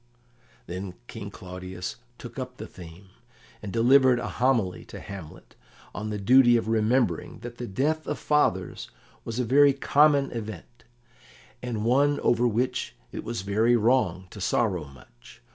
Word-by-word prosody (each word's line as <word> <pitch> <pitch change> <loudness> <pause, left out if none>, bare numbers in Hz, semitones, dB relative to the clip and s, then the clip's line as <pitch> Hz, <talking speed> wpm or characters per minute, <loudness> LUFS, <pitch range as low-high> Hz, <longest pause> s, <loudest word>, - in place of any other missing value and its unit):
Then 90 +1 -6
King 110 -4 -8
Claudius 90 -1 -7 0.2
took 120 +2 -9
up 125 -1 -6
the - - -7
theme, 90 +2 -13 0.5
and 105 - -6
delivered 130 +3 +5
a 120 - -3
homily 120 -8 0
to - - -10
Hamlet 90 -3 -10 0.4
on 105 0 -4
the 105 - -3
duty 120 +4 +6
of 115 - -2
remembering 115 +3 +1
that 120 0 -9
the 120 - -4
death 150 +10 -1
of - - -2
fathers 95 -12 0 0.3
was 115 0 -5
a 125 - 0
very 140 +4 +5
common 140 0 +3
event, 115 +1 -8 0.8
and 110 -3 -3
one 140 +4 +3
over 120 +1 +3
which 125 +3 -1 0.2
it - - -6
was 115 -4 -4
very 110 +5 +2
wrong 110 -6 +2
to 105 - -9
sorrow 90 -5 0
much. 65 -3 -17
115 Hz, 150 wpm, -26 LUFS, 95-125 Hz, 0.8 s, duty